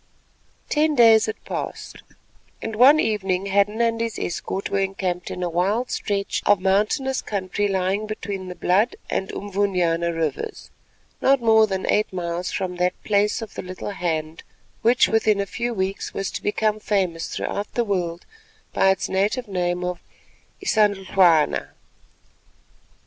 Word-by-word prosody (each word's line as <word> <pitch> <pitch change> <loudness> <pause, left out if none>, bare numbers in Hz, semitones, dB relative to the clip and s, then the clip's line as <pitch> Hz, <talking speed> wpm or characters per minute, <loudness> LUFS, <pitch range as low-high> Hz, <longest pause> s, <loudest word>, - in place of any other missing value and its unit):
Ten 305 0 +2
days 225 -3 +6
had 220 - -6
passed, - - -6 0.6
and 225 -1 -5
one 270 +7 +7
evening 195 -6 0
Hadden 200 +3 +1
and 230 -1 +1
his 230 -1 -2
escort 190 +2 -4
were 200 - +1
encamped 190 -2 -2
in 180 - -4
a - - 0
wild 200 +9 0
stretch 200 -2 -2
of 205 -2 +5
mountainous 210 +8 +1
country 200 0 -2
lying 195 +2 -1
between 200 -3 -5
the 180 - -7
Blood 195 +7 +2 0.2
and 190 - -1
Unvunyana 180 -4 0
Rivers, 160 -4 -4 0.5
not 275 0 +4
more 220 -2 +5
than 190 -2 -3
eight 210 +1 +1
miles 175 -1 -3
from 180 -1 -3
that 180 +1 +1
"Place 210 +2 +1
of 220 - -10
the - - -5
Little 185 +2 -6
Hand" 160 -4 -3 0.4
which 240 +2 +4
within 220 -2 +2
a 200 - 0
few 240 +4 -3
weeks 195 -2 -3
was 195 - -2
to - - -5
become 215 +1 0
famous 185 -6 -1
throughout 205 +1 -4
the 240 - +1
world 175 -4 -2 0.5
by 195 - +4
its 190 - +1
native 210 +6 0
name 180 -2 -1
of 180 -1 -3 0.6
Isandhlwana. 190 - +3
195 Hz, 150 wpm, -23 LUFS, 180-215 Hz, 0.6 s, one